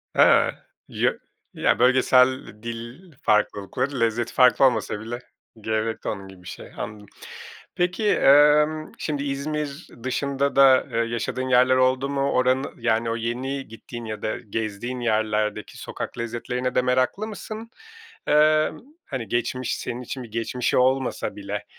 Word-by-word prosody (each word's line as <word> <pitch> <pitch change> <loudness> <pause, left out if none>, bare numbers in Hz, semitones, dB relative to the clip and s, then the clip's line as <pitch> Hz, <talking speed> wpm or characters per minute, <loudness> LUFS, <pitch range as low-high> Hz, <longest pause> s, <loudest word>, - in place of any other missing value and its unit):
Eee, - - +5 0.3
ya - - +1 0.4
ya - - +1
bölgesel 130 +1 +4 0.2
dil 120 +10 -8
farklılıklarıç 105 +6 0
lezzet 115 -1 0
farkı 125 +1 +5
olmasa 110 -4 +2
bileç 120 +2 -6 0.4
gerekli 110 +1 -2
onun 100 -2 -5
gibi 95 -2 -14
bir - - -12
şey. - - -9
Anladım. 105 -1 -6 0.7
Peki, 185 +4 0
emm, 150 +1 +4
şimdi 145 -2 -3
İzmir 145 +2 -4 0.2
dışında 140 +1 -1
da, 135 -1 +6
eee, 115 - -2
yaşadığın 120 +2 -2
yerler 125 +1 +5
oldu 130 +1 +2
mu? 140 0 0
Oranı 130 +2 +1
yani 115 -1 0
o 115 - -1
yeni 130 +4 -3
gittiğin 115 +1 -9
ya 110 -1 -6
da 110 - -2
gezdiğin 110 +3 -4
yerlerdeki 110 -2 -1
sokak - - -6
lezzetlerine 120 +2 -3
de 125 - +4
meraklı 130 +12 0
mısın? 220 +1 -8 0.6
Eee, 155 +1 +4 0.3
hani 125 -6 -5
geçmiş, 120 +3 -1
senin 120 +1 -5
için 130 +1 -6
bir 115 - -12
geçmişi 115 +2 -1
olmasa 130 +1 +1
bile, 100 0 -5
125 Hz, 140 wpm, -24 LUFS, 115-140 Hz, 0.7 s, da